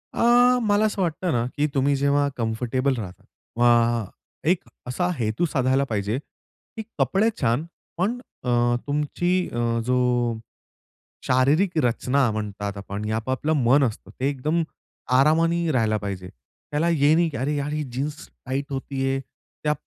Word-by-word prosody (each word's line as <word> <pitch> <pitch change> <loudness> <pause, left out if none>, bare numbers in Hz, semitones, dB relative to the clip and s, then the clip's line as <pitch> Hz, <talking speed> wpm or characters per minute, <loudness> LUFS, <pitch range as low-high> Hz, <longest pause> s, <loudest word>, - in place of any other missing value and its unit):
अ, 245 +1 +5
मला 210 0 +3
असं 210 -2 -1
वाटतं 175 0 -1
ना, 120 -3 +1
की 150 +1 +2
तुम्ही 140 +1 +3
जेव्हा 140 +1 +2
कम्फर्टेबल 125 +4 0
राहतात 95 -5 -8 0.3
वा 120 -2 +3 0.4
एक 180 - +3 0.3
असा 175 +8 -1
हेतू 110 +8 0
साधायला 135 -3 +1
पाहिजे, 105 +2 -1
की 220 +8 -12 0.2
कपडे 210 +4 +3
छान 125 +5 +1 0.3
पण 210 +8 0 0.3
अ, 125 - 0 0.4
तुमची 150 +5 0 0.2
अ, - - -3 0.3
जो 125 0 +2 1.3
शारीरिक 150 +8 +3
रचना 125 +2 +2
म्हणतात 105 -1 -4
आपण, 100 +1 -6
हे 110 - -2
आपापलं 130 +7 -1
मन 135 +5 +5
असतं, 110 -5 -3
ते 130 - +1
एकदम 155 +5 0 0.5
आरामाने 165 +3 +3
राहायला 110 -5 +2
पाहिजे. 95 -3 -5 0.4
त्याला 150 +3 +1
हे 150 -3 +4
नाही, 170 0 +3
की 145 - -6
अरे 145 +4 -1
यार, 145 +1 -2
ही 150 - -1
जीन्स 145 +3 -3 0.3
टाईट 135 +2 -2
होतेय, 135 0 -2 0.4
त्या 150 0 +2
135 Hz, 145 wpm, -24 LUFS, 120-160 Hz, 1.3 s, अ